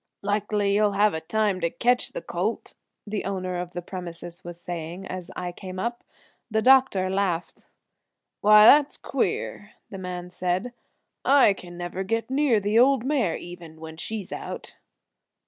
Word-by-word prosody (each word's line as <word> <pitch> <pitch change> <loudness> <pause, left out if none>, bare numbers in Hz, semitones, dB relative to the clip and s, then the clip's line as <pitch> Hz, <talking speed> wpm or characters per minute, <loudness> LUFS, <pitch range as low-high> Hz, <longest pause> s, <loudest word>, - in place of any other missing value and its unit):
"Likely 205 0 0
you'll 205 0 +3
have 205 +1 +3
a 160 - -3
time 205 +1 0
to 170 - +1
ketch 245 +7 +1
the - - -5
colt," - - -3 0.3
the 210 -1 -3
owner 185 -2 -3
of 175 0 -5
the 175 - -5
premises 175 -1 -8
was 175 0 -8
saying 175 +2 -6
as 185 -2 -6
I 180 -1 -4
came 185 +1 -8
up. 235 +5 -3 0.5
The 220 -1 0
doctor 255 -8 +5
laughed. 185 -3 -2 0.7
"Why, 210 +1 +7
that 290 +4 +8
is - - -8
queer," 210 - -2 0.2
the 195 - -6
man 180 -1 -6
said. 185 +7 -2 0.5
"I 270 -6 +6
can 175 -2 -11
never 175 +2 -4
get 225 +5 -2
near 270 -5 +3
the 205 +3 +2
old 260 -1 +4
mare 260 - +1
even, 170 -2 -10
when 160 0 -8
she's 205 +3 -5
out." - - -7
195 Hz, 165 wpm, -25 LUFS, 175-220 Hz, 0.7 s, that